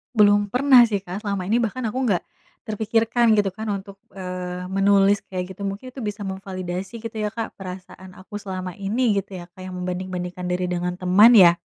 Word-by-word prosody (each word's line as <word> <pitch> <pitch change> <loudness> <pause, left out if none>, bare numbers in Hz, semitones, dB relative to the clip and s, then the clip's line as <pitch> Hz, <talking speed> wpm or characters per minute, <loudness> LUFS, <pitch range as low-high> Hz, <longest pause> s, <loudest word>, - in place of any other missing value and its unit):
Belum 205 -1 +5
pernah 255 0 +7
sih, 215 -4 +1
Kak, 195 +2 -7
selama 200 -3 -2
ini 215 - +2
bahkan 250 +3 -3
aku 255 +5 -2
enggak 205 -8 +1 0.4
terpikirkan 225 +2 +2
gitu 205 -2 +3
kan 215 +4 -7
untuk, 195 0 -7 0.2
eee, 180 -1 -5
menulis 195 +1 +4
kayak 185 0 -5
gitu 200 - -8
mungkin 200 +6 -5
itu 255 - -19
bisa 210 0 -4
memvalidasi 190 +1 -5
gitu 230 0 -7
ya, 210 -1 -2
Kak, 225 0 -5
perasaan 185 -1 -9
aku 185 +3 -12
selama 185 -3 -6
ini 210 +2 +1
gitu 195 -1 -4
ya 175 - -10
kayak 185 0 -8
membanding-bandingkan 180 0 -4
diri 180 0 -1
dengan 180 0 -1
teman 190 +6 +6
ya? 180 -6 +8
195 Hz, 185 wpm, -23 LUFS, 185-215 Hz, 0.4 s, ya